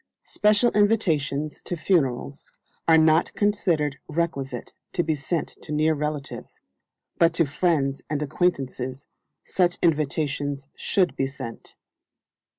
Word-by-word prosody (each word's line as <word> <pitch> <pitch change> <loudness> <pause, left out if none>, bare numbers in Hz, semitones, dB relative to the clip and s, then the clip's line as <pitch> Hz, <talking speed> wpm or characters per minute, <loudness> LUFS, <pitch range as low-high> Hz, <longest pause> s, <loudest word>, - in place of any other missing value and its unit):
Special 210 +3 +3
invitations 160 -9 +1
to 175 - -4
funerals 140 -5 0 0.4
are 165 -1 +7
not 160 +1 +4
considered 170 -9 +1
requisite 140 -6 -3 0.2
to 175 - +1
be 160 - +1
sent 150 +3 -2
to - - -8
near 155 +1 +3
relatives; 150 -1 -5 0.6
but 165 0 +4
to 165 - +4
friends 145 -2 0
and 150 0 -1
acquaintances 135 -4 -1 0.4
such 180 -1 +1
invitations 145 -3 0
should 185 -3 +1
be 135 - 0
sent. 130 -4 -9
155 Hz, 115 wpm, -25 LUFS, 140-175 Hz, 0.6 s, are